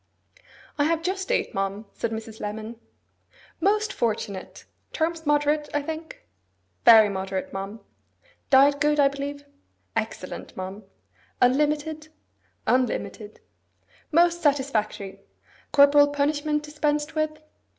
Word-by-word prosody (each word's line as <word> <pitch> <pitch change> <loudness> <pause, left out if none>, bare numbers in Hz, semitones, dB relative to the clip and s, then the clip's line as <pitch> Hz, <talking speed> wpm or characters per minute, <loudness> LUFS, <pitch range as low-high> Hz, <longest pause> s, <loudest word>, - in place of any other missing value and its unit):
'I 290 - +4
have 330 +1 0
just 380 +2 -2
eight, - - 0
ma'am,' 195 +1 -2
said 230 - -2
Mrs. 220 0 -7
Lemon. 220 +2 -6 0.8
'Most 425 +1 +1
fortunate! 210 -4 -3 0.3
Terms 320 -1 -2
moderate, 295 0 +2
I 290 - +1
think?' 320 - -7 0.6
'Very 220 -2 +9
moderate, 190 -1 -4
ma'am.' 195 +3 -6 0.7
'Diet 280 +1 +5
good, 295 0 +2
I 280 -1 +6
believe?' 285 +1 -6 0.5
'Excellent, - - -5
ma'am.' 190 +2 -6 0.6
'Unlimited?' 300 +4 +1 0.6
'Unlimited.' 240 -4 -1 0.7
'Most 345 +2 +3
satisfactory! 260 - 0 0.5
Corporal 285 0 +6
punishment 295 +1 0
dispensed 300 0 -1
with? 310 -1 -1
285 Hz, 105 wpm, -25 LUFS, 220-305 Hz, 0.8 s, Very